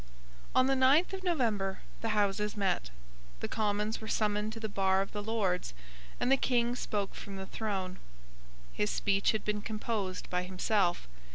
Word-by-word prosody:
On 255 - +6
the 270 0 +3
ninth 275 +8 +5
of 380 -1 -4
November 225 - 0 0.2
the 220 -2 0
Houses 210 +1 +1
met. 190 - 0 0.5
The - - -2
Commons 210 0 0
were 220 - -6
summoned 210 0 +1
to 225 - -6
the 220 - -2
bar 195 -1 +2
of 195 - -10
the 205 - -3
Lords; 200 - -1 0.4
and 250 - +2
the 270 - +7
King 240 -2 +2
spoke 205 -5 -2
from 200 -2 -7
the 190 0 -5
throne. 190 -3 -3 0.7
His 105 +12 0
speech 200 0 +2
had 220 - -3
been 210 0 0
composed 210 -3 -3
by 180 0 +1
himself. 180 - +1
210 Hz, 170 wpm, -32 LUFS, 195-225 Hz, 0.7 s, the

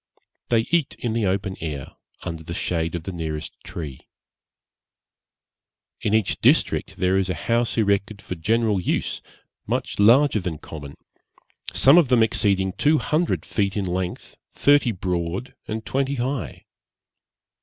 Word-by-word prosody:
They 115 -2 +4
eat 170 -4 +1
in 120 -2 -2
the 115 -3 +1
open 95 0 -1
air, 75 -4 -4 0.3
under 80 -1 -5
the 85 +1 -6
shade 85 -1 -1
of 85 - -4
the 95 - -5
nearest 80 -3 -4
tree. 75 -6 -7 1.9
In 105 0 +1
each 110 -4 0
district - - +2
there 95 +1 +2
is 95 -1 -1
a 90 - -1
house 115 +8 0
erected 100 -1 +1
for 95 - -6
general 105 +3 +1
use, - - -1 0.5
much - - -2
larger 120 +4 +5
than 90 -4 -4
common, 75 -2 -9 0.8
some 140 +6 +6
of 165 - +3
them 120 -3 +4
exceeding 100 -4 +1
two 155 +7 +3
hundred 155 +3 0
feet 100 -1 -1
in 100 - 0
length, 90 0 -4 0.2
thirty 145 -4 +4
broad, 90 +3 -3
and 110 +1 -4
twenty 135 +1 0
high. 125 - -3
100 Hz, 145 wpm, -23 LUFS, 90-115 Hz, 1.9 s, some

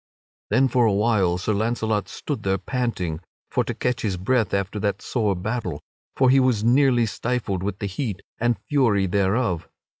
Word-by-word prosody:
Then 135 +1 +4
for 125 -2 +3
a 105 - +2
while 100 -4 +2
Sir 100 +4 -1
Launcelot 110 0 -1
stood 145 -7 -4
there 95 -2 +1
panting 95 -7 -2 0.3
for - - +2
to - - -3
catch 125 -1 -1
his 100 -4 -1
breath 110 +2 +1
after 100 +2 -1
that 100 -1 -1
sore 105 -6 0
battle, 90 -5 -3 0.4
for 130 -1 +4
he 135 - +6
was 125 -5 +2
nearly 125 0 +4
stifled 110 -4 -2
with 100 0 -3
the 100 - -4
heat 100 -1 -4 0.2
and 120 -1 +1
fury 120 -10 +3
thereof. 95 -1 0
110 Hz, 175 wpm, -23 LUFS, 95-125 Hz, 0.4 s, he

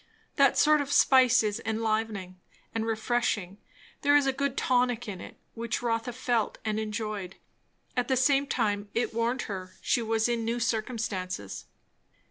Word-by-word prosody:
That - - +4
sort 305 -1 +5
of 285 0 -4
spice 260 -4 +5
is 210 -1 -2
enlivening 215 -4 -2 0.3
and 225 0 -2
refreshing; 220 -4 -1 0.4
there 285 0 +4
is 290 -1 +5
a 270 - +1
good 280 0 -2
tonic 245 -2 +1
in 190 -4 -6
it, - - -11 0.2
which 235 +1 -3
Rotha 230 0 -1
felt 240 -2 -1
and 215 0 0
enjoyed; 210 -3 -4 0.6
at 245 -1 0
the 260 - +2
same 275 +2 +3
time 205 -5 -1
it 235 0 0
warned 235 +3 0
her 185 -3 -6
she 240 - +1
was 225 0 +1
in 235 -1 -1
new 230 +2 -1
circumstances. 215 - -3
225 Hz, 155 wpm, -28 LUFS, 215-250 Hz, 0.6 s, sort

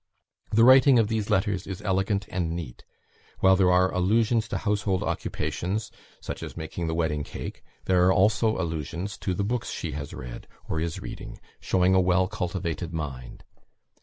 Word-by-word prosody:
The 115 +2 +4
writing 130 +1 +7
of 110 -2 +3
these 110 -2 -1
letters 95 0 0
is 95 -2 -5
elegant 100 +1 0
and 85 -3 -2
neat; 80 -9 -7 0.6
while 95 0 +6
there 95 -1 +4
are 90 +1 +3
allusions 110 +4 +2
to - - -2
household 100 -3 0
occupations 90 +8 -3 0.3
such - - -6
as - - -7
making 80 +1 -4
the 80 - -1
wedding 75 -3 0
cake; - - -7 0.2
there 90 -1 +4
are - - +5
also 110 +3 +3
allusions 85 +3 -3
to 95 - -2
the 100 - -1
books 115 +3 -2
she 85 - -4
has 70 0 -6
read, - - -8 0.2
or 80 - -2
is 80 0 -3
reading, - - -8 0.2
showing 95 0 +2
a 95 - +5
well 90 0 +3
cultivated 90 -4 -3
mind. 70 -5 -6
95 Hz, 170 wpm, -26 LUFS, 85-105 Hz, 0.6 s, writing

